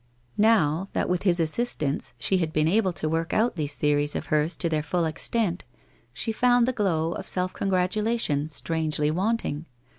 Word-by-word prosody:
Now, 195 -5 +3
that - - 0
with 180 -1 0
his 180 -3 +2
assistance, 155 - -1
she 185 +10 +1
had 160 -3 -1
been 155 0 +1
able 195 +2 +2
to 155 - -3
work 165 +1 -1
out 230 +1 +2
these 150 -3 -3
theories 145 0 +1
of - - -3
hers 155 +3 +2
to 170 - -1
their 155 -2 0
full 170 +3 -1
extent, 175 +4 -1 0.5
she 225 - -3
found 245 +1 +3
the 255 - +1
glow 170 -7 0
of - - -6
self 185 0 -1
congratulation 190 -4 0
strangely 155 -1 -1
wanting. 180 -4 -1
170 Hz, 175 wpm, -26 LUFS, 155-205 Hz, 0.5 s, Now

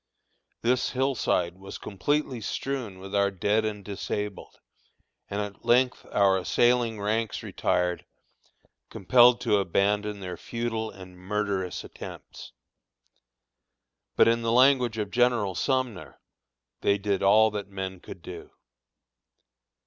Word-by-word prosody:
This 125 +2 +2
hillside 120 -9 0
was 95 0 -8
completely 130 +5 -2
strewn 125 -6 -4
with 95 +1 -10
our 100 -1 +3
dead 100 +3 0
and 105 -2 -4
disabled, 105 0 -5 0.7
and 100 - -3
at 105 -1 -7
length 125 +1 +2
our 95 -2 +3
assailing 115 +6 +2
ranks 110 +2 -1
retired, 90 -1 -1 0.9
compelled 120 +5 +5
to 105 - +2
abandon 100 +3 0
their 90 -2 -6
futile 115 0 -3
and 95 -2 -13
murderous 100 -1 -2
attempts. - - -10 1.6
But - - +5
in 115 0 +3
the 115 0 0
language 125 -2 +4
of 105 -2 -3
General 120 -5 +2
Sumner, 115 - -2 0.6
"they 100 - +2
did 100 -1 -1
all 110 +3 +5
that 105 -1 -5
men 95 -1 -5
could - - -11
do." - - -9
105 Hz, 120 wpm, -27 LUFS, 95-120 Hz, 1.6 s, compelled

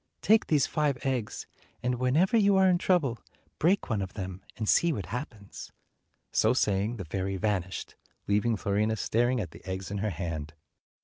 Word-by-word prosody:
Take 220 +1 +4
these 150 -4 +3
five 150 -4 0
eggs, 125 -5 -2 0.4
and 125 0 0
whenever 150 - +3
you 200 -3 +5
are 190 0 +5
in 180 -1 +3
trouble, 155 -11 +1 0.4
break 185 +5 +2
one 110 -4 -1
of 95 -1 -6
them, 95 -2 -5 0.2
and 110 - -3
see 170 +9 +4
what 100 - -3
happens." 115 - -7 0.6
So 110 +2 +4
saying, 105 0 +1
the' 95 - -6
fairy 95 +4 -2
vanished, 95 -3 -2 0.3
leaving 105 +2 +1
Fiorina 105 +2 0
staring 120 +4 +1
at 90 -7 -4
the - - -14
eggs 95 +1 -5
in 100 - -2
her 105 +2 0
hand. 80 -4 -5
110 Hz, 175 wpm, -28 LUFS, 95-135 Hz, 0.6 s, you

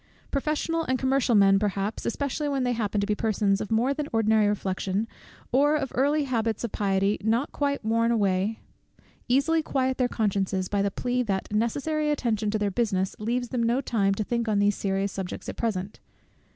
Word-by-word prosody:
Professional 305 +3 -1
and 260 - 0
commercial 260 -2 +2
men 195 -1 +6
perhaps, 200 0 -2
especially 285 +4 -2
when 275 -2 0
they 245 - +1
happen 210 -3 -1
to 200 - +1
be 210 - 0
persons 210 -2 +1
of 210 - -4
more 235 +5 +2
than 295 0 -3
ordinary 220 -1 +3
reflection, 195 +1 -1 0.4
or 290 +4 +4
of 270 -4 -2
early 290 +4 +2
habits 230 -5 -1
of 235 - -3
piety 195 0 +1
not 230 +6 +1
quite 280 -5 -1
worn 230 +1 +2
away, 205 -1 +1 0.7
easily 280 +6 +3
quiet 260 -3 -1
their 250 - +3
consciences 195 -5 -1
by 200 +1 0
the 200 - +1
plea, 250 +5 -1
that 200 -3 -2
necessary 290 +8 0
attention 225 -7 0
to 215 - 0
their 205 -1 0
business 190 -3 0
leaves 240 +3 -1
them 250 - -1
no 235 +2 +2
time 200 -7 +1
to 215 - -1
think 235 +2 -2
on 215 -2 +1
these 205 +1 +3
serious 195 0 -1
subjects 190 -2 -6
at - - -5
present. 205 -4 -3
225 Hz, 190 wpm, -26 LUFS, 200-260 Hz, 0.7 s, men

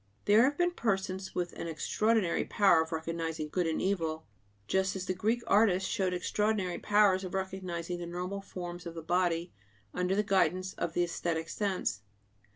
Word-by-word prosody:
There 210 +2 +6
have 285 +2 0
been 350 0 +2
persons 190 - -2
with 175 -1 -2
an - - -5
extraordinary 200 +4 +1
power 195 -6 +4
of 160 - -4
recognizing 160 -1 -3
good 175 +1 0
and 160 - -1
evil, 165 -5 -1 0.4
just 190 0 +1
as 190 -1 -4
the 185 - -1
Greek 225 +5 0
artists 195 -3 +3
showed 190 -4 0
extraordinary 190 0 0
powers 205 -2 +4
of 185 0 -5
recognizing 180 -2 -3
the 175 - -5
normal 180 +3 -4
forms 175 -3 -7
of 170 - -7
the 165 - -6
body 175 0 0 0.4
under 180 +1 0
the 210 - +2
guidance 185 -1 +1
of 165 - -3
the 175 - +2
æsthetic 170 -1 -2
sense. 190 - -1
185 Hz, 170 wpm, -31 LUFS, 170-195 Hz, 0.4 s, There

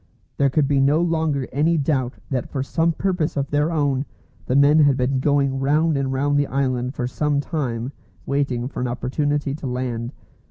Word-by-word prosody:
There 140 - +3
could 140 +1 +2
be 140 -1 +2
no 145 +3 +3
longer 160 -5 0
any 160 +4 +2
doubt 135 -4 0 0.2
that 125 -3 -2
for 135 -2 -2
some 165 +4 +1
purpose 180 -3 -1
of 140 0 -2
their 145 +3 +1
own 145 -4 +1 0.4
the 130 - 0
men 145 +2 +5
had 145 -3 +4
been 130 +1 0
going 140 -1 +1
round 150 +4 +2
and 135 -1 -1
round 145 +2 +1
the 145 - +1
island 130 -1 -1
for 125 - -2
some 145 +3 0
time, 130 -6 -3 0.3
waiting 135 -3 -1
for 135 - -6
an 125 - 0
opportunity 140 +4 -1
to 145 -2 -5
land. 125 -1 -3
140 Hz, 190 wpm, -22 LUFS, 130-150 Hz, 0.4 s, men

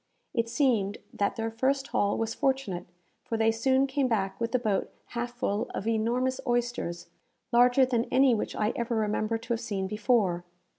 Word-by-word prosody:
It 230 -1 0
seemed 230 -7 +1 0.2
that 200 - 0
their 225 0 -2
first 270 +4 0
haul 205 0 +1
was 225 0 -1
fortunate, 265 -10 -1 0.4
for 225 - -3
they 225 0 +3
soon 260 +4 +2
came 275 0 0
back 195 -5 -1
with 230 0 0
the 255 - +3
boat 215 -5 0 0.2
half 245 +1 -4
full 210 -3 -1
of - - -4
enormous 240 +4 0
oysters, 240 -8 -1 0.4
larger 245 +2 +5
than 240 -2 0
any 260 0 +4
which 220 - -2
I 215 +1 0
ever 235 0 -1
remember 215 +1 0
to 230 +1 -14
have 230 - -2
seen 200 -5 -2
before. 205 -3 +1
230 Hz, 180 wpm, -28 LUFS, 215-250 Hz, 0.4 s, larger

